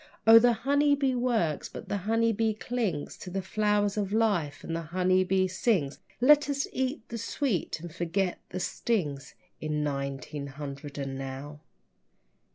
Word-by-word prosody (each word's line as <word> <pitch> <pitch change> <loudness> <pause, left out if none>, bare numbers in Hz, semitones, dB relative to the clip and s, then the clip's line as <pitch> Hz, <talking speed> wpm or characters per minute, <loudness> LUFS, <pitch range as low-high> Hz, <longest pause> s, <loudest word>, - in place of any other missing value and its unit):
O, 225 +1 +10
the 240 +1 +4
honeybee 285 -1 +3
works, 235 - 0
but - - -9
the 205 - -1
honeybee 225 -1 +2
clings 215 -10 -2
To - - -7
the 190 +1 -3
flowers 210 0 +1
of 200 -2 -1
life 200 -10 +1
and 165 - -3
the 165 - -2
honeybee 185 +3 +2
sings! 185 - 0 0.2
Let 290 +4 +6
us 280 -1 0
eat 260 -1 -2
the 230 - -4
sweet 230 - -1
and 170 -2 -8
forget 175 +2 -1
the 185 - -4
stings 160 - -2 0.2
In 150 -1 -1
nineteen 140 0 -3
hundred 140 +1 -7
and 135 -1 -4
now! 135 +2 -6
185 Hz, 150 wpm, -28 LUFS, 150-230 Hz, 0.2 s, O